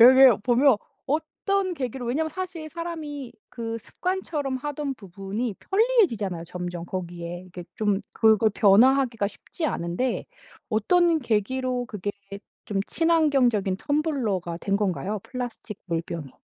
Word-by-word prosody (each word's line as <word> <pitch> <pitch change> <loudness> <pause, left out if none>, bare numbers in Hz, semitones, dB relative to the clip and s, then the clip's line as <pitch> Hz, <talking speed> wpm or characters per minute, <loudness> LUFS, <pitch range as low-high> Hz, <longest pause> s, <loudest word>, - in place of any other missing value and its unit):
여기 255 -1 +9
보면 250 +1 +5 0.3
어떤 360 +6 0
계기로 255 -3 -4
왜냐하면 310 +6 0
사실 355 -3 -5
사람이 305 -6 -5 0.2
그 230 -1 -4
습관처럼 305 - -2
하던 290 0 -3
부분이 200 +3 -4
편리해지잖아요, 340 - +2
점점 175 -1 -5
거기에. 175 -1 -5
이게 175 -1 -9
좀 205 -2 +1
그걸 220 -1 +5
변화하기가 230 +1 +5
쉽지 320 +8 -5
않은데 175 - -1 0.5
어떤 335 - +3
계기로 250 +1 0
그게 205 -4 -4 0.5
좀 195 -2 -1
친환경적인 275 - +2
텀블러가 230 - -1
된 200 0 +1
건가요? 200 +1 -1
플라스틱 245 -4 -6
물병이. 165 -4 -4
240 Hz, 300 characters per minute, -25 LUFS, 195-295 Hz, 0.5 s, 여기